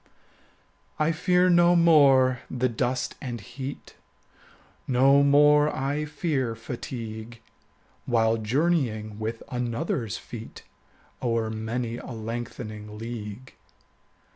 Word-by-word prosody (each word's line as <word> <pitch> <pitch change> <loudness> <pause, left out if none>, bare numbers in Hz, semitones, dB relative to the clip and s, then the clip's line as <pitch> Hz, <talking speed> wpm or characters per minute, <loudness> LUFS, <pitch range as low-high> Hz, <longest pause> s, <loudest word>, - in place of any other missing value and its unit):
I 155 +1 +2
fear 180 +2 +2
no 175 0 +5
more 140 -7 +5
the 130 0 0
dust 125 +2 -1
and 120 -3 -5
heat, 130 +6 -8 0.9
25 - - -3
No 135 +3 +5
more 150 +1 +5
I 145 +2 -2
fear 145 -6 -2
fatigue, 115 -1 -7 0.7
While 115 -2 +2
journeying 110 -4 0
with 110 +1 -4
another's 120 - -2
feet 115 -1 -10 0.6
O'er 115 -3 0
many 115 +2 -3
a - - -9
lengthening 110 -2 -6
league. 115 +2 -7
125 Hz, 100 wpm, -26 LUFS, 115-140 Hz, 0.9 s, no